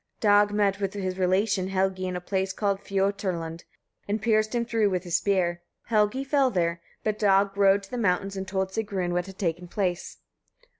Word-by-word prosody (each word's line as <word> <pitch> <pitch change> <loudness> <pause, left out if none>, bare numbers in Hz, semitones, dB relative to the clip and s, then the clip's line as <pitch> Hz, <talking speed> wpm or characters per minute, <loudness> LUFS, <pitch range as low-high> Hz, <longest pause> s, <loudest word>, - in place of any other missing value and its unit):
Dag 205 -1 +5
met 205 -1 +1
with 195 0 -2
his 185 -2 -3
relation 185 +1 +1
Helgi 190 -1 0
in 180 - -3
a - - -2
place 190 +1 -1
called 200 -1 0
Fioturlund, 190 -5 -2 0.4
and 205 +2 -1
pierced 215 +1 +1
him 235 -1 0
through 225 -3 +1
with 185 -2 -1
his 175 -2 +1
spear. 180 -4 0 0.3
Helgi 215 +4 +2
fell 275 -1 +2
there, 170 -5 -1 0.2
but 215 -1 -1
Dag 195 -1 +3
rode 200 0 +4
to 195 - -14
the 250 - -3
mountains 195 -1 0
and 190 0 -4
told 190 0 -1
Sigrun 195 -4 -2
what 175 +1 -1
had 190 -1 -11
taken 175 -1 -2
place. 180 -1 -2
195 Hz, 190 wpm, -26 LUFS, 185-205 Hz, 0.4 s, Dag